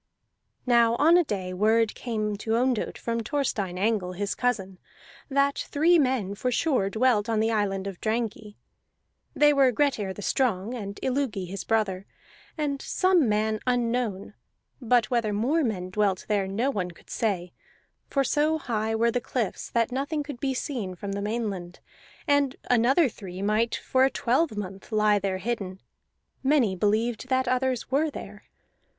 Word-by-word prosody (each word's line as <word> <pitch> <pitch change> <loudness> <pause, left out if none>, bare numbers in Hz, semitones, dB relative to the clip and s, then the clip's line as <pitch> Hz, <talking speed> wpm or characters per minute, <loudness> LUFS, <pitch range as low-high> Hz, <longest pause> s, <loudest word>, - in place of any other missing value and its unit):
Now 235 -2 +4
on 320 +7 +5
a 355 - +5
day 190 - -4
word 220 +3 +2
came 215 -3 -3
to 220 +2 -1
Ondott 245 -1 0
from 230 0 -2
Thorstein 215 -7 -2
Angle 195 -2 0
his 200 +2 -2
cousin, 195 -7 -2 0.5
that 280 0 +2
three 330 +4 +3
men 255 -8 +1
for 250 +5 -2
sure 250 -7 +1
dwelt 225 -1 +2
on 225 -1 +1
the 225 +1 +2
island 195 -3 0
of 195 -3 -6
Drangey; 220 -2 -3 0.8
they 295 0 +5
were 270 -2 +4
Grettir 235 -7 0
the 200 +2 -8
Strong 225 -4 0
and 200 -4 -6
Illugi 255 -8 -1
his 195 +2 -5
brother 205 -4 0 0.5
and 285 -3 -2
some 365 - +2
man 215 +1 +1
unknown; 235 -5 -1 0.5
but 240 -2 +2
whether 230 -3 +1
more 255 +11 +1
men 185 -7 -2
dwelt 195 -2 0
there 205 -2 +1
no 225 +8 0
one 185 -8 -2
could 170 - -15
say, 180 -6 -1 0.6
for 275 - +1
so 300 +4 +1
high 225 -5 -2
were 230 +1 +2
the 245 - -1
cliffs 230 -4 -3
that 230 0 +1
nothing 285 +4 -2
could 285 -4 -8
be 270 0 -1
seen 235 -10 -3
from 200 +3 -6
the 200 +1 -3
mainland, 205 -5 -3 0.5
and 285 -2 +2 0.2
another 255 +6 +4
three 195 -4 -7
might 215 +3 +1
for 260 0 +1
a 265 - +5
twelvemonth 215 - -1
lie 210 -1 +3
there 195 -1 -1
hidden. 195 -2 -4 0.6
Many 265 -8 +2
believed 220 +5 0
that 260 -1 +1
others 255 0 0
were 300 +4 +2
there. - - -9
225 Hz, 160 wpm, -26 LUFS, 200-260 Hz, 0.8 s, on